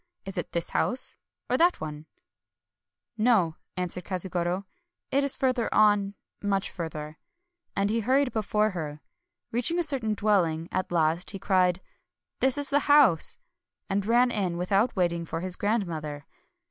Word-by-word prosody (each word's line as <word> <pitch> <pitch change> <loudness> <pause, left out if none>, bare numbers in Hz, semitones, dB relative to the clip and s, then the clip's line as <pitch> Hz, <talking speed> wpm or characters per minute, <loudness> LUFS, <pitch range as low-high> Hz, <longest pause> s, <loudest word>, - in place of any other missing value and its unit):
— - - -52
is 195 - -6
it - - -4
this 170 -1 -2
house 255 - +2 0.3
or 250 - +1
that 345 +3 +3
one? 155 0 -7 0.3
" - - -64
" - - -57
No," 175 -9 +2 0.2
answered 180 0 -2
Katsugoro, 180 0 0
— 350 0 -51
" - - -57
it 280 +1 +2
is 280 - +2
further 255 -3 0
on 205 -1 +3
— - - -54
much 200 -1 -1
further," 155 -3 -6 0.3
— 350 0 -54
and 200 +1 +1
he 230 - +1
hurried 260 +4 +2
before 215 0 0
her. 155 -4 -6 0.5
Reaching 245 +9 +1
a 350 - +2
certain 255 -9 -1
dwelling 175 -6 +1
at 185 -1 -2
last, 165 +1 +1
he 200 - 0
cried, 185 -2 +1 0.6
"This 265 0 +2
is 285 -1 -2
the 285 +1 +1
house!" 270 - +6 0.3
— - - -54
and 200 +1 +1
ran 240 +4 +3
in, 185 -6 -1
without 195 +7 +1
waiting 170 -3 0
for 165 0 -5
his 185 0 -4
grandmother. 165 -10 -2
195 Hz, 175 wpm, -27 LUFS, 170-240 Hz, 0.6 s, house